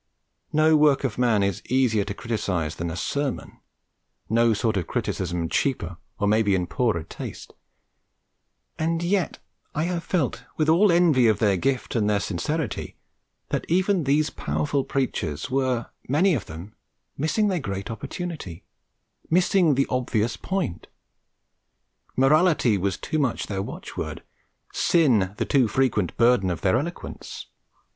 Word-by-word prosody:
No 155 +1 +4
work 150 -2 +4
of 125 -3 -2
man 115 -5 +3
is 100 -2 -1
easier 120 -5 +2
to 100 - -5
criticise 95 -10 -2
than 85 +1 -3
a 80 - -5
sermon, 140 +8 -3 0.7
no 115 +1 +4
sort 110 0 0
of 90 -4 -1
criticism 85 -1 -2
cheaper 90 - -1 0.2
or 105 - 0
maybe 105 -1 +3
in 90 -1 0
poorer 110 -4 0
taste; 80 - -8 1.3
and 165 +1 0
yet 185 +1 0 0.4
I 155 - +1
have 175 0 -2
felt, 165 -9 -1
with 155 0 +2
all 180 +5 +5
envy 165 -8 +4
of 110 - +3
their 105 -4 +2
gift 130 +7 -1
and 105 -3 +2
their 105 -1 +2
sincerity, 120 - -3 0.5
that - - -1
even 185 -1 +2
these 150 +3 +2
powerful 145 -2 -1
preachers 100 - -2
were, 130 -3 0 0.2
many 170 +8 +3
of 115 - -2
them, 85 +6 -9 0.4
missing 205 +9 +1
their 185 -3 0
great 100 -5 -4
opportunity, 115 - -6 0.7
missing 180 -2 +3
the 135 - +2
obvious 120 -3 0
point. 185 - -3 1.3
Morality 145 - +4
was 95 0 -1
too 155 - -2
much 130 -5 0
their 95 -2 -3
watchword, - - -6 0.5
Sin 115 - +3
the - - 0
too 130 -4 +3
frequent 110 -6 0
burden 115 -5 +4
of 85 - -3
their 95 0 +3
eloquence. 170 +5 -7
125 Hz, 140 wpm, -25 LUFS, 100-155 Hz, 1.3 s, all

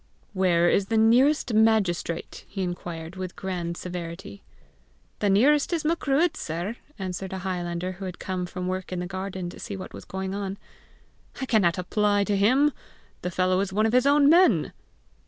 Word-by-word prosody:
"Where 175 -3 +3
is 195 +2 +2
the 225 - +1
nearest 245 +4 +4
magistrate?" 210 -6 +1
he 195 -2 -4
inquired 175 -1 -5
with 185 -1 -5
grand 175 -3 -4
severity. 180 +2 -7 0.8
"The 205 - +1
nearest 280 - +4
is 330 - 0
the 305 - +1
Macruadh, 325 0 +1
sir!" 175 +9 -4 0.2
answered 190 -1 -5
a - - -3
highlander 175 -1 -2
who 190 +1 -8
had 180 -1 -6
come 185 -1 -3
from 180 0 -5
work 185 0 -3
in 180 - -3
the 180 - -3
garden 190 0 -5
to - - -12
see 200 - -6
what 185 - -8
was - - -9
going 190 0 -4
on. 200 -1 -4 0.8
"I 265 - -2
cannot 195 -9 +2
apply 205 +2 +1
to 205 0 0
him; 255 +9 +4 0.5
the 180 - -2
fellow 185 +1 +1
is 195 -1 -1
one 215 +3 +2
of 225 - +1
his 250 +2 +4
own 285 0 +5
men!" 350 +4 +4
190 Hz, 180 wpm, -26 LUFS, 180-220 Hz, 0.8 s, own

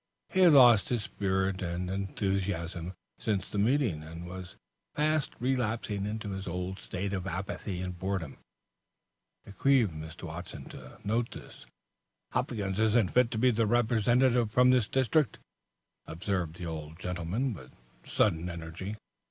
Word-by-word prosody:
He 190 - -1
had 175 -4 +8
lost 120 -7 +7
his 120 -4 0
spirit 95 -1 -1
and 90 0 -2
enthusiasm 95 -2 -2 0.2
since 100 -3 -1
the 105 - -3
meeting, 115 - +2
and 80 +3 -8
was 90 0 -8 0.4
fast 155 -1 +1
relapsing 115 -5 -1
into 105 -1 -4
his 95 0 -5
old 90 +2 -3
state 95 +2 -4
of 95 -1 -3
apathy 95 -1 -4
and 90 -1 -5
boredom. 95 -5 -3 1.1
It 100 - -13
grieved 130 -9 +4
Mr. 80 +1 -9
Watson 85 +2 -7
to 65 0 -11
note 115 +3 0
this. - - -11 0.6
"Hopkins 110 -6 -1
isn't 110 -2 +3
fit 125 -1 +4
to 115 - -3
be 125 +3 +4
the 115 -1 +1
Representative 120 +1 +3
for 125 +3 +4
this 125 -4 +5
district," 135 +4 +2 0.7
observed 90 -1 -2
the 90 -1 -6
old 80 -1 -6
gentleman, 90 +9 -2
with 65 -10 -12 0.3
sudden 85 +2 +1
energy. 85 +4 -6
100 Hz, 145 wpm, -30 LUFS, 90-120 Hz, 1.1 s, had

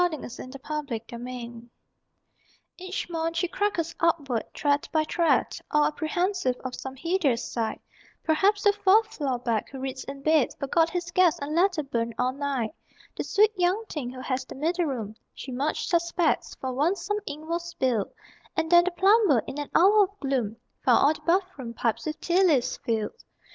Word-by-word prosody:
SONNETS 315 -8 -2
IN - - -7
A 275 - -9
LODGING 290 -7 -3
HOUSE 240 -1 -7
I 240 - -20 1.1
Each 370 +1 -4
morn 330 -1 -2
she 340 +2 0
crackles 345 -4 -1
upward, 290 -8 +1
tread 290 -1 0
by 315 -1 +2
tread, 335 +2 +1
All 300 0 +3
apprehensive 335 -2 0
of 255 - -3
some 265 +1 -6
hideous 290 -5 0
sight: 225 -2 -2 0.4
Perhaps 390 +6 +2
the 410 - +5
Fourth 420 +2 +3
Floor 270 -5 -1
Back, 235 -3 -1
who 270 - -8
reads 260 0 -4
in 275 0 -8
bed, 310 -3 +3
Forgot 325 +4 +2
his 350 -1 -3
gas 365 -3 +4
and 285 +2 -4
let 360 +1 +3
it 285 -3 -4
burn 230 -1 -1
all 250 +1 +1
night 275 -3 -2 0.4
The - - -2
Sweet 425 +1 +4
Young 370 +4 +1
Thing 275 -6 -4
who 255 0 -8
has 255 0 -2
the - - -10
middle 335 +5 0
room, 225 -7 -4 0.2
She 265 - -7
much 275 +5 -1
suspects: 340 -1 +1
for 260 -1 -4
once 320 +9 0
some 415 0 0
ink 300 +2 -6
was 340 +1 -2
spilled, 255 - 0 0.5
And 320 - 0
then 345 0 +7
the - - +2
plumber, 390 - +5
in 290 - -6
an 290 - -4
hour 405 +3 +6
of 400 +2 -17
gloom, 250 -6 -1 0.3
Found 245 -3 +5
all 295 - +5
the - - -13
bathroom 335 -10 0
pipes 230 +6 -1
with 305 - -4
tea 365 +2 +2
leaves 290 -9 +3
filled. 230 - -3
305 Hz, 190 wpm, -26 LUFS, 255-355 Hz, 1.1 s, then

